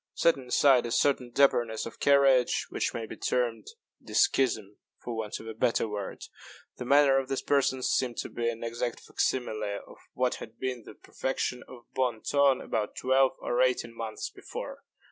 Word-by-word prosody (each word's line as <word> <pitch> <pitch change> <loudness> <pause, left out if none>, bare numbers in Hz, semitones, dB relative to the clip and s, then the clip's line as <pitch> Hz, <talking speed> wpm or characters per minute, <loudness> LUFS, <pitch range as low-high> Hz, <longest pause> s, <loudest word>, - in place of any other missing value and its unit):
Setting 135 -6 +2
aside 125 -1 +4
a - - -6
certain 130 -1 +2
dapperness 120 -5 +2
of 115 - -9
carriage, 135 -3 +4
which - - -1
may 115 - -4
be - - -8
termed 115 -3 -1 0.4
deskism 110 -6 +1 0.2
for 120 - -6
want 110 -2 -4
of - - -11
a 110 - -6
better 115 +1 +1
word, 105 -2 -5 0.5
the 125 - -6
manner 140 0 +5
of 135 0 -5
these 135 - -2
persons 130 -2 +1
seemed 125 -3 0
to - - -4
me 115 0 -1
an 115 0 -5
exact 120 +1 -3
fac - - -17
simile 110 -5 -1
of - - -15 0.2
what 125 0 0
had 110 - -10
been 125 -3 -4
the - - -11
perfection 130 -1 -3
of 120 -2 -12
bon 125 -4 -1
ton 140 -2 +3
about 105 -2 -3
twelve 130 +1 +3
or 120 +1 0
eighteen 125 -2 +1
months 115 -1 -5
before. - - -8
125 Hz, 180 wpm, -29 LUFS, 115-130 Hz, 0.5 s, manner